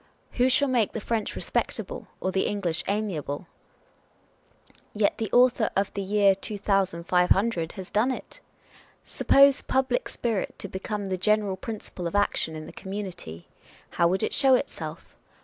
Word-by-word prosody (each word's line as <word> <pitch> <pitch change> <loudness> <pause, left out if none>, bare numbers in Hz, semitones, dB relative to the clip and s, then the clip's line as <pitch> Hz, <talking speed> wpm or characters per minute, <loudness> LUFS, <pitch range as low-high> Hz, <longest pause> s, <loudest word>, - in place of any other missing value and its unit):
W 245 - +2
ho - - +4
shall 285 +2 +3
make 240 -5 +1
the - - -3
French 220 0 -2
respectable, - - -3
or 185 - -1
the 190 - +1
English 180 -6 -2
amiable? 190 -7 -2 1.5
Yet 210 -1 +1
the 220 -3 -2
Author 245 -2 +4
of 195 0 0
The 200 - -3
Year 200 0 +4
2500 190 -2 +1
l - - -17
has 190 -3 -8
done 215 +5 +2
it! - - -7 0.7
Suppose 275 0 +4
public 260 -1 0
spirit 225 -5 -2
to - - -6
become 200 +2 -4
the 190 -1 -2
general 210 0 +2
principle 190 -3 -6
of 170 - -5
action 205 -5 +1
in 155 0 -7
the - - -11
community 190 - -7
â€" - - -28 0.2
how 170 - +5
would 185 +2 0
it - - 0
show 270 -2 +5
itself? - - -5
200 Hz, 160 wpm, -26 LUFS, 185-225 Hz, 1.5 s, how